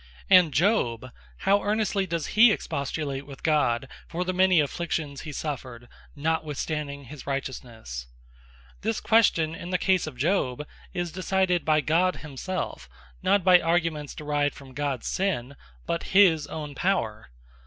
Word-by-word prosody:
And 180 Hz, -4 st, +7 dB
Job, 130 Hz, -, +1 dB, 0.3 s
how 200 Hz, +1 st, +3 dB
earnestly 205 Hz, -2 st, 0 dB
does 170 Hz, -3 st, -3 dB
he 225 Hz, +1 st, +7 dB
expostulate 140 Hz, -5 st, -3 dB
with 140 Hz, -2 st, -11 dB
God, 135 Hz, -5 st, +2 dB, 0.2 s
for 175 Hz, +2 st, -2 dB
the 185 Hz, -, -1 dB
many 185 Hz, -1 st, +4 dB
Afflictions 150 Hz, -1 st, -2 dB
he 155 Hz, -, -7 dB
suffered, 130 Hz, -5 st, -5 dB, 0.3 s
notwithstanding 150 Hz, -1 st, -2 dB
his 140 Hz, +2 st, -11 dB
Righteousnesse? 120 Hz, -, -5 dB, 0.7 s
This 220 Hz, +1 st, -1 dB
question 185 Hz, -8 st, +3 dB
in 170 Hz, +1 st, -7 dB
the 180 Hz, -, +1 dB
case 185 Hz, -2 st, +1 dB
of 140 Hz, -5 st, -8 dB
Job, 150 Hz, -3 st, 0 dB, 0.3 s
is 175 Hz, -1 st, -3 dB
decided 185 Hz, -1 st, +1 dB
by 155 Hz, -1 st, +3 dB
God 175 Hz, +4 st, +2 dB
himselfe, 155 Hz, -, -5 dB, 0.3 s
not 200 Hz, -2 st, +3 dB
by 180 Hz, -1 st, +7 dB
arguments 165 Hz, -3 st, 0 dB
derived 145 Hz, -1 st, -1 dB
from 135 Hz, -2 st, -13 dB
Job's 140 Hz, -3 st, -2 dB
Sinne, 140 Hz, -9 st, -1 dB, 0.3 s
but 170 Hz, -, -1 dB, 0.2 s
his 165 Hz, -7 st, +5 dB
own 150 Hz, -2 st, -6 dB
Power. 115 Hz, -, -1 dB
155 Hz, 140 wpm, -26 LUFS, 140-185 Hz, 0.7 s, And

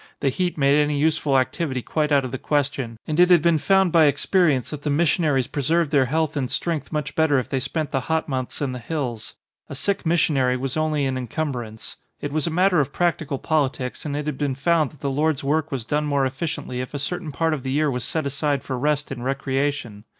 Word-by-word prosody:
The 135 Hz, -, +1 dB
heat 175 Hz, +7 st, -1 dB
made 140 Hz, +1 st, +4 dB
any 150 Hz, 0 st, 0 dB
useful 150 Hz, -2 st, +2 dB
activity 130 Hz, -1 st, -1 dB
quite 155 Hz, -1 st, -1 dB
out 140 Hz, -2 st, +4 dB
of 125 Hz, -, -5 dB
the 130 Hz, -, -4 dB
question 140 Hz, -6 st, -1 dB
and 155 Hz, +1 st, -2 dB
it 180 Hz, 0 st, +6 dB
had 175 Hz, -4 st, +6 dB
been 170 Hz, -2 st, +3 dB
found 190 Hz, +1 st, +3 dB
by 160 Hz, -1 st, +6 dB
experience 145 Hz, -1 st, +2 dB
that 150 Hz, -2 st, -6 dB
the 150 Hz, -, -2 dB
missionaries 145 Hz, -3 st, +2 dB
pre 145 Hz, -, -4 dB
served 160 Hz, +2 st, +1 dB
their 140 Hz, -4 st, +4 dB
health 155 Hz, +3 st, 0 dB
and 130 Hz, -4 st, -1 dB
strength 165 Hz, -4 st, -2 dB
much 150 Hz, -3 st, -3 dB
better 160 Hz, -3 st, +3 dB
if 130 Hz, -, -2 dB
they 135 Hz, -, 0 dB
spent 155 Hz, +4 st, -3 dB
the 135 Hz, -, +1 dB
hot 160 Hz, 0 st, +1 dB
months 130 Hz, -2 st, -4 dB
in 140 Hz, -3 st, 0 dB
the 125 Hz, -, -5 dB
hills. 125 Hz, -3 st, -4 dB, 0.3 s
A -, -, -6 dB
sick 195 Hz, +8 st, -1 dB
missionary 145 Hz, -6 st, +2 dB
was 130 Hz, 0 st, -3 dB
only 155 Hz, -2 st, 0 dB
an 130 Hz, -1 st, -1 dB
encumbrance. 120 Hz, -4 st, -5 dB, 0.2 s
It 145 Hz, -, -4 dB
was 155 Hz, 0 st, 0 dB
a -, -, +1 dB
matter 180 Hz, +1 st, +3 dB
of 140 Hz, -1 st, 0 dB
practical 160 Hz, -5 st, 0 dB
politics 135 Hz, -4 st, -1 dB
and 145 Hz, -2 st, -3 dB
it 150 Hz, -, -3 dB
had 150 Hz, -3 st, -3 dB
been 140 Hz, -3 st, 0 dB
found 155 Hz, +1 st, +2 dB
that 150 Hz, -, -20 dB
the 140 Hz, -, -1 dB
Lord's 150 Hz, +1 st, 0 dB
work 155 Hz, +2 st, 0 dB
was 130 Hz, -5 st, -3 dB
done 150 Hz, +5 st, 0 dB
more 140 Hz, -2 st, +2 dB
efficiently 130 Hz, -2 st, -3 dB
if 130 Hz, +3 st, -7 dB
a -, -, 0 dB
certain 160 Hz, +3 st, -3 dB
part 160 Hz, +2 st, 0 dB
of 150 Hz, -, -3 dB
the 130 Hz, 0 st, -3 dB
year 150 Hz, +1 st, +2 dB
was 125 Hz, -2 st, -2 dB
set 155 Hz, +4 st, -2 dB
aside 140 Hz, 0 st, -1 dB
for 130 Hz, -2 st, -4 dB
rest 150 Hz, +1 st, 0 dB
and 120 Hz, -2 st, -5 dB
recreation. 135 Hz, -4 st, -2 dB
145 Hz, 235 wpm, -23 LUFS, 135-155 Hz, 0.3 s, it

